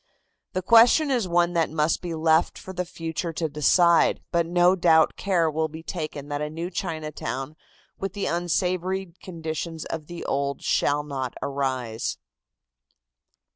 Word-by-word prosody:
The 185 - -2
question 235 - +6
is 240 -7 +1
one 175 0 +2
that 165 -2 +1
must 155 0 0
be 170 -2 -4
left 160 +1 +2
for 190 - -9
the 180 0 -2
future 165 0 -4
to 160 +1 -1
decide, 165 +3 +4
but 170 -1 +1
no 175 +2 +4
doubt 165 -3 +4
care 180 -4 +1
will 160 +1 0
be 160 +1 -10
taken 155 -5 -5
that 145 0 -3
a 150 - -2
new 165 +4 -5
Chinatown 155 -4 -4 0.4
with 195 -1 -3
the 200 -1 -3
unsavory 180 +1 -1
conditions 165 -2 -5
of 155 -2 -5
the 175 -1 -7
old 140 0 -2
shall 145 +1 +1
not 135 -4 -4
arise. 130 -5 -2
165 Hz, 150 wpm, -25 LUFS, 150-175 Hz, 0.4 s, question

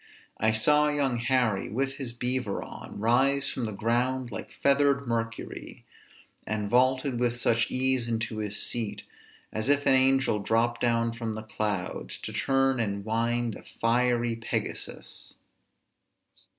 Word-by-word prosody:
I 110 +1 +3
saw 150 +7 +4
young 140 -4 0
Harry 115 -4 +1
with 135 +4 -2
his 130 -4 -4
beaver 125 -3 -1
on - - -9
Rise 135 +5 +2
from 125 - -3
the - - -4
ground 120 +4 0
like - - -6
feathered 140 0 +3
Mercury; 115 -1 -4 0.6
And 105 -1 -2
vaulted 130 0 +2
with 120 -1 +1
such 115 -1 +2
ease 130 -2 +1
into 110 -1 -2
his 105 -1 -2
seat, 115 -3 -2 0.5
As 110 +5 -1
if 145 0 +3
an 135 - +5
angel 130 -4 +3
dropped 115 +3 +1
down 115 -1 +2
from 115 -1 -4
the 110 - -6
clouds 105 -4 -3
To - - -6
turn 135 -1 +2
and 100 -3 -2
wind 115 +1 0
a - - -9 0.2
fiery 120 0 +2
Pegasus." 115 0 -4
120 Hz, 140 wpm, -28 LUFS, 110-130 Hz, 0.6 s, an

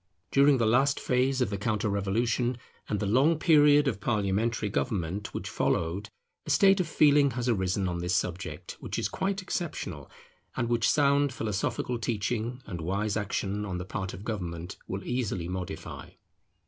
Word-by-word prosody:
During 140 0 +5
the 115 - +2
last 135 +5 +3
phase 130 +1 +1
of 110 - +1
the 100 - -3
counter 105 0 0
revolution, 115 +5 0 0.3
and 105 - 0
the 105 - -1
long 135 +10 +3
period 150 -3 +5
of 105 -7 -1
parliamentary 110 +1 0
government 100 -2 -2
which - - -5
followed, 90 +6 -1 0.3
a - - -9
state 195 +6 +5
of 180 - 0
feeling 145 -2 +5
has 125 0 -1
arisen 95 -4 +1
on 85 -1 -2
this 90 +1 0
subject, 85 -2 -3
which - - -5
is - - 0
quite 195 0 -2
exceptional, 95 - -4 0.5
and 120 - 0
which 120 -3 +2
sound 140 -1 +3
philosophical 115 +2 -2
teaching, 115 +3 -2
and 85 -3 -6
wise 100 +5 -1
action 105 -1 -2
on 95 -3 -3
the 90 - -5
part 95 -1 -4
of 95 - -9
government, 90 -5 -4
will 95 +1 -4
easily 115 -9 -2
modify. 90 0 -6
110 Hz, 165 wpm, -28 LUFS, 95-130 Hz, 0.5 s, During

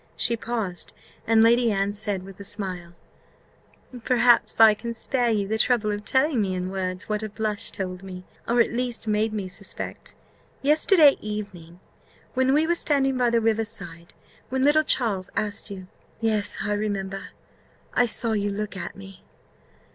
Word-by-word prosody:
She 235 - +1
paused; 225 -6 -4 0.3
and 225 0 +5
Lady 235 0 +4
Anne 200 0 0
said 205 -2 -1
with 195 0 -12
a - - -7
smile, 185 -4 -4 1.1
"Perhaps 240 -2 +3
I 220 -1 +9
can 235 +2 -6
spare 245 +1 0
you 205 -3 0
the 220 +2 -1
trouble 230 -3 +2
of 205 0 -4
telling 265 0 +2
me 190 -2 -1
in 180 +1 -3
words 185 -1 -4
what 210 0 -1
a 215 - -4
blush 210 -1 -3
told 185 -2 -5
me, 185 -1 -9 0.2
or 235 +1 +2
at 235 - +3
least 240 -2 -3
made 215 +1 +1
me 205 -3 -3
suspect, 195 +1 -8 0.5
yesterday 305 +1 +5
evening, 195 -5 -7 0.5
when 260 0 +2
we 310 +2 +3
were 340 - +2
standing 275 -5 +1
by 250 -1 +2
the 235 0 +2
river 225 0 +2
side, 175 -7 -10 0.3
when 260 0 0
little 295 +2 +5
Charles 220 -10 +1
asked 210 0 -2
you 190 -2 -8 0.2
" - - -34
"Yes, 220 -3 0
I 210 - -1
remember 195 -2 -3 0.7
I 245 - +3
saw 230 0 0
you 205 -1 0
look 210 +1 -4
at 185 - -6
me." 195 -1 -12
215 Hz, 170 wpm, -25 LUFS, 195-235 Hz, 1.1 s, I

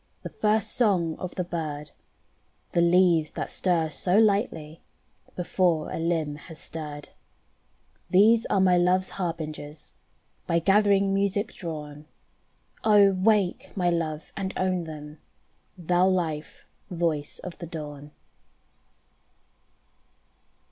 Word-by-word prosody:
The - - -5
first 215 0 0
song 180 -9 +1
of 185 - -6
the 180 - -1
bird, 155 -4 -5 0.8
The 170 - +2
leaves 170 -2 +4
that - - -4
stir 165 -4 0
so 180 +5 +1
lightly 200 -8 +1 0.5
Before 175 -3 0
a - - -3
limb 160 -3 -1
has 160 +1 -12
stirred: 150 -3 -7 1.0
These 220 +5 +5
are 200 - +1
my 185 -1 +4
love's 180 +1 +2
harbingers 155 -4 -6 0.5
By 170 - +2
gathering 200 +1 +3
music 200 +2 0
drawn. 150 -4 -7 0.8
Oh! 205 -2 +6
wake 195 0 +1
my 175 -2 +2
love 160 -2 -3
and 195 -1 -4
own 185 -2 0
them, 150 -1 -9 0.6
Thou 180 +1 +2
life 165 -5 -2 0.2
voice 165 -4 -2
of 180 - -8
the 170 - -6
Dawn. 150 -3 -8
175 Hz, 115 wpm, -26 LUFS, 155-190 Hz, 1.0 s, Oh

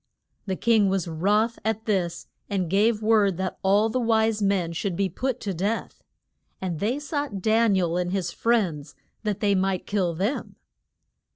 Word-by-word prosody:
The 190 - -1
king 220 -1 +3
was 190 -3 -1
wroth 205 +8 +1
at 220 0 -2
this 185 -6 -1 0.2
and 185 -5 -1
gave 215 +2 +2
word 210 -4 +3
that 190 0 -3
all 200 +3 +3
the 255 +3 -1
wise 220 -2 +2
men 195 -4 +1
should 180 +2 -2
be 195 +1 0
put 255 +7 -2
to 200 -3 -3
death. 200 +6 -3 0.6
And 175 -4 -3
they 230 +6 0
sought 290 -7 -3
Dan 220 +1 +3
i - - +3
el 170 0 0
and 180 0 -1
his 185 -3 -1
friends, 170 -12 0 0.3
that 210 -3 -2
they 205 -2 +3
might 190 -1 0
kill 185 -5 0
them. 205 - -2
200 Hz, 175 wpm, -25 LUFS, 185-220 Hz, 0.6 s, king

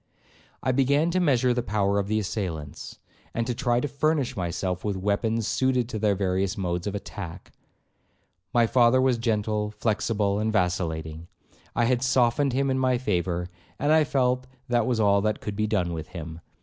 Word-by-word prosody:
I 130 - +2
began 140 +5 +2
to 185 - +1
measure 130 -7 +3
the 125 - 0
power 100 -2 +1
of 100 - -2
the 110 +1 0
assailants, 90 -8 -4 0.4
and 115 - 0
to 125 - -1
try 120 -1 +1
to 145 - -1
furnish 145 -1 0
myself 90 0 -2
with 100 -2 -1
weapons 110 +3 0
suited 130 -1 +1
to 110 - -4
their 105 -1 +2
various 95 +1 0
modes 90 -1 -2
of 100 - -3
attack. 95 -3 -7 1.0
My 120 -1 +4
father 120 +2 +4
was 130 -2 +2
gentle, 105 -2 0
flexible, 105 -1 0
and 110 +1 0
vacillating. 85 -5 -1 0.5
I 120 - +3
had 125 0 +1
softened 130 +1 +2
him 135 +1 +1
in 130 - 0
my 130 -1 +2
favour, 90 -6 -1 0.3
and 145 +2 +1
I 160 0 +6
felt 130 -2 0 0.2
that 120 -1 +2
was 120 -3 +1
all 100 -2 +4
that 110 +1 0
could 105 - -5
be 110 +1 0
done 90 -5 0
with 80 0 -5
him. 85 -2 -8
110 Hz, 180 wpm, -26 LUFS, 95-125 Hz, 1.0 s, I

